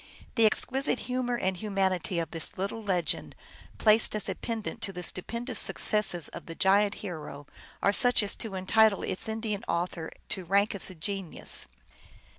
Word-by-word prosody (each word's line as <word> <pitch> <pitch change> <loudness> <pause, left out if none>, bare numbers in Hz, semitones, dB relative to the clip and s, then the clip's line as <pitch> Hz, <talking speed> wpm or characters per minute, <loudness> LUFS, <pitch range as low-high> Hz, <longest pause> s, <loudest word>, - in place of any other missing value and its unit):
The 225 -3 +5
exquisite 265 +4 +1
humor 250 -1 -1
and 190 -4 0
humanity 190 -3 -1
of 165 -1 -2
this 165 -2 -3
little 200 +4 -3
legend, 185 -5 -1 0.4
placed 215 0 +5
as 215 - 0
a 190 - -1
pendant 225 +3 -5
to 200 - -2
the 180 -1 -7
stupendous 235 +8 -3
successes 200 -6 +3
of - - -10
the 165 - -7
giant 200 +2 +3
hero, 155 -5 -7 0.4
are 200 - +4
such 245 0 +5
as 200 - -1
to 215 -4 -6
entitle 205 +2 +3
its 190 - -1
Indian 220 -1 -3
author 170 -1 -2 0.2
to 190 - -3
rank 200 +4 +2
as 200 - +1
a 185 - -10
genius. 190 +1 -3
200 Hz, 165 wpm, -29 LUFS, 185-220 Hz, 0.4 s, The